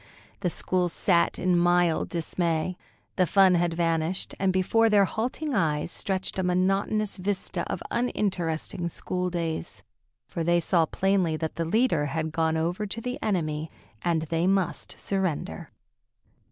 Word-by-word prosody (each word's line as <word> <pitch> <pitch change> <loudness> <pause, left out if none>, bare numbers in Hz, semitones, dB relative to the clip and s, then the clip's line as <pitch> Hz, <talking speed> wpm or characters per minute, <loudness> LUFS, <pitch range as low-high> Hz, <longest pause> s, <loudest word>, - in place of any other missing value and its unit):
The 180 - 0
school 180 +1 0
sat 170 0 +2
in 180 -1 +2
mild 175 -1 +3
dismay. 170 0 -1 0.4
The 185 - +3
fun 190 +1 +5
had 175 -1 +1
vanished, 165 +1 0
and 195 -1 +2
before 225 +5 +3
their 205 -2 +5
halting 255 - -3
eyes 155 -5 +1
stretched 190 0 -2
a - - +1
monotonous 195 +4 +1
vista 190 +1 -2
of - - -4
uninteresting 180 -7 -1
school 180 +2 -3
days. 165 - -4 0.4
For 165 - -3
they 175 +1 +3
saw 170 -1 +2
plainly 185 -4 +1
that 160 0 -3
the 165 - -1
leader 170 -5 +2
had 160 +2 -2
gone 160 0 +1
over 175 +6 -1
to 215 - -4
the 250 +2 -4
enemy, 155 -6 -1 0.3
and 165 -2 +1
they 165 +2 0
must 190 -3 0
surrender. 180 - -2
175 Hz, 145 wpm, -27 LUFS, 165-195 Hz, 0.4 s, fun